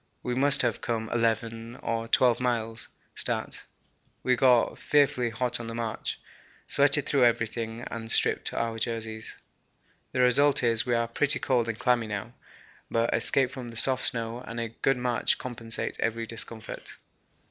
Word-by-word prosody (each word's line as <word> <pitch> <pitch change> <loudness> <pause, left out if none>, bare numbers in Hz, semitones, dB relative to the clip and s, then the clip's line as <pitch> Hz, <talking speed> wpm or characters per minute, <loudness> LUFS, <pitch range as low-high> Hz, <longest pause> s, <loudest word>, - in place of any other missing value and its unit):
We 125 - -2
must 140 +2 +5
have 120 -3 -1
come 110 -1 -3
11 115 0 -1
or 115 -2 -3
12 120 0 +3
miles 115 -2 -2 0.3
(stat.). - - -1 0.6
We 125 - +3
got 125 -1 +3
fearfully 140 -4 +2
hot 125 +1 -1
on 115 - -6
the 115 - -6
march, 115 -2 -4 0.5
sweated 140 0 +4
through 135 -4 +3
everything 115 0 -1
and 115 -1 -5
stripped - - +3
off 115 -1 -2
jerseys. 110 -1 -4 0.8
The 130 - 0
result 135 +3 +4
is 115 0 +2
we 120 - +2
are 115 0 0
pretty 140 +5 +1
cold 120 -3 0
and 110 - -3
clammy 120 -2 +1
now, 110 +3 -5 0.6
but 115 0 0
escape 135 -3 +1
from 125 -3 -7
the 115 - -8
soft 130 +2 +3
snow 115 0 -3
and 115 -2 -7
a 115 -1 -3
good 135 +4 0
march 125 -1 0
compensate 115 -2 -4
every 115 0 -1
discomfort. 115 0 -5
115 Hz, 160 wpm, -27 LUFS, 115-125 Hz, 0.8 s, must